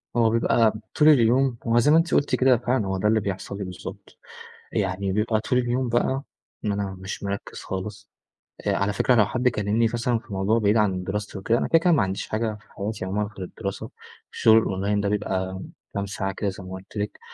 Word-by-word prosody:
هو 115 -2 +4
بيبقى 115 -1 +3 0.2
طول 150 0 +6
اليوم 130 -1 +4
هو 115 +1 +4
زي 135 +5 +4
ما 160 - +7
أنتِ 165 -1 +1
قُلتِ 140 -2 +3
كده 130 -1 +4
فعلًا 120 -3 0
هو 95 0 -1
ده 95 - +1
اللي 110 +1 +3
بيحصل 100 -1 -4
لي 100 - -4
بالضبط، 90 -1 -9 0.5
يعني 95 0 -1
بيبقى 110 +2 +1
طول 125 +3 +1
اليوم 125 +1 0
بقى، 130 +3 +1 0.4
ما 105 -2 0
أنا 100 -1 -3
مش 95 +2 -6
مرَكَّز 100 0 -5
خالص، 105 +2 -6 0.6
آآ - - +2
على 100 +1 0
فكرة 125 +5 +3
لو 110 -3 +5
حد 125 +4 -1
كلمني 105 0 +1
مثلًا 120 0 0
في 120 - -22
الموضوع 100 +2 0
بعيد 105 0 +3
عن 95 -4 +1
دراستي 105 +2 -4
وكده 110 +5 +1
أنا - - -1
كده، 165 - +5
كده 175 +2 +3
ما 150 -11 +4
عنديش 95 0 -3
حاجة 110 0 -1
في - - -24
حياتي 105 -1 -4
عمومًا 100 +2 -1
غير 95 - -4
الدراسة، 100 0 -6 0.4
الشغل 110 0 +5
الأونلاين 100 -1 +1
ده 100 - 0
بيبقى 95 -2 -2 0.3
كام 100 0 -1
ساعة 95 0 -3
كده 100 +1 -2
زي 95 0 -8
ما 95 - -9
قُلت 95 +3 -9
لِك، 105 0 -3
105 Hz, 215 wpm, -24 LUFS, 100-120 Hz, 0.6 s, ما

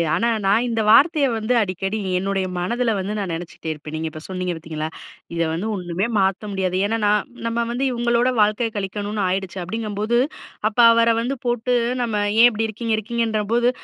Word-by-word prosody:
ஆனா 235 - +1 0.2
நான் 215 +5 +3
இந்த 225 -2 0
வார்த்தைய 295 +5 +6
வந்து 220 +3 0
அடிக்கடி, 195 +2 -2 0.2
என்னுடைய 195 0 -1
மனதில 235 +7 0
வந்து 195 +3 -3
நான் 190 -4 -3
நினைச்சிட்டே 165 -1 -6
இருப்பேன். 150 0 -7
நீங்க 160 +1 -2
இப்ப 155 0 -10
சொன்னீங்க 185 -1 -3
பார்த்தீங்களா? 155 -1 -5 0.5
இத 170 - -1
வந்து 175 +7 -2
ஒன்னுமே 180 +1 -2
மாத்த 195 +2 0
முடியாது, 190 -2 -1
ஏன்னா 225 +2 0
நான் 210 0 +2 0.2
நம்ம 230 0 0
வந்து 250 +3 -1
இவங்களோட 240 +1 +1
வாழ்க்கைய 215 +2 +2
கழிக்கணுன்னு 205 +1 -3
ஆயிடுச்சு 190 0 -3
அப்படிங்கும்போது, 215 +3 -1 0.5
அப்ப 220 - -6
அவர 230 0 +4
வந்து 265 +4 -2
போட்டு 245 +1 0 0.3
"நம்ம 225 -3 -2 0.3
ஏன் 240 - +9
இப்படி 225 0 -1
இருக்கீங்க, 225 +1 -3
இருக்கீங்கன்ற 225 0 -1
போது, 240 +1 +3
210 Hz, 175 wpm, -22 LUFS, 185-235 Hz, 0.5 s, ஏன்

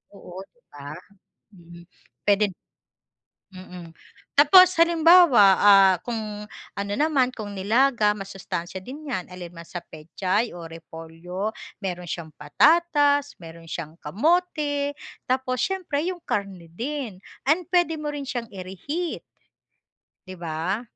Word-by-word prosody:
Oo 180 -1 -11
'di 240 +5 -36
ba? 145 +1 -9 0.6
Mhm, 170 -1 -15 0.4
puwede 205 -1 +2 1.0
mm. 180 -2 -10 0.5
Tapos 365 +6 +7
halimbawa, 335 - +6 0.2
ah, 195 -2 +7
kung 235 -2 -4 0.6
ano 200 0 -4
naman, 290 -4 +2
kung 210 -4 -7
nilaga, 220 +3 +2
masustansiya 190 -2 -6
din 290 +7 -9
'yan. 185 -10 -4
Alin 175 -1 -9
man 170 0 -10
sa 175 - -6
pechay 185 +8 -3
o 170 -1 -9
repolyo, 165 +5 -7 0.3
mayroon 180 -3 -5
siyang 165 -4 -6
patatas, 290 - +3
mayroon 165 -1 -12
siyang 165 -2 -6
kamote, 290 - 0 0.3
tapos 255 -1 0
siyempre 360 -7 -2
'yong 360 0 -3
karne 195 -4 -3
din 230 - -5 0.3
and 325 +5 +3
pwede 350 -3 +2
mo 300 -1 -4
rin 285 -2 -6
siyang 240 -3 -4
ire-heat. 200 - -5 1.0
'Di 185 - -8
ba? 170 +5 -3
205 Hz, 120 wpm, -24 LUFS, 175-290 Hz, 1.0 s, Tapos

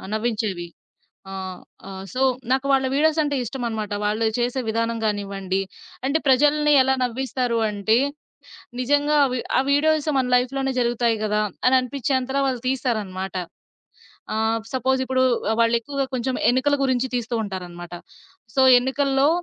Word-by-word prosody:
ఆ! - - -14
నవ్వించేవి. 215 -6 -2 0.6
ఆ! - - -7 0.5
ఆ - - -8 0.2
సో, 255 - -2 0.3
నాకు 265 +1 +1
వాళ్ళ 265 -1 +3
వీడియోసంటే 305 -1 +2
ఇష్టమనమాట. 230 -4 -4
వాళ్ళు 215 +2 0
చేసే 245 +2 0
విధానం 230 +1 -1
గానివ్వండి, 195 -2 -2 0.5
అంటే 280 +3 +2
ప్రజల్ని 295 +3 +4
ఎలా 265 +1 +2
నవ్విస్తారు 250 -1 -2
అంటే 210 +2 +1 0.8
నిజంగా 290 +3 +2
అవి 255 -1 -2 0.2
ఆ - - +5
వీడియోస్ 310 +1 +2
మన 260 - +1
లైఫ్‌లోనే 270 +2 0
జరుగుతాయి 235 -1 +1
గదా! 210 0 +1 0.2
అని 255 - +5
అనిపించేంతలా 265 +1 -1
వాళ్ళు 250 -3 -3
తీస్తారనమాట. 210 -8 -2 1.0
ఆహ్, 220 +1 0
సపోజ్ 260 +1 +1
ఇప్పుడు 260 0 +2 0.3
ఆ! - - +2
వాళ్ళేక్కువగా 235 +4 0
కొంచెం 255 +1 -2 0.2
ఎన్నికల 260 +3 +2
గురించి 260 0 0
తీస్తూ 240 0 -3
ఉంటారనమాట. 175 -3 -7 0.6
సో, 265 - +4 0.2
ఎన్నికల్లో 270 +2 +1
250 Hz, 130 wpm, -23 LUFS, 220-270 Hz, 1.0 s, ఆ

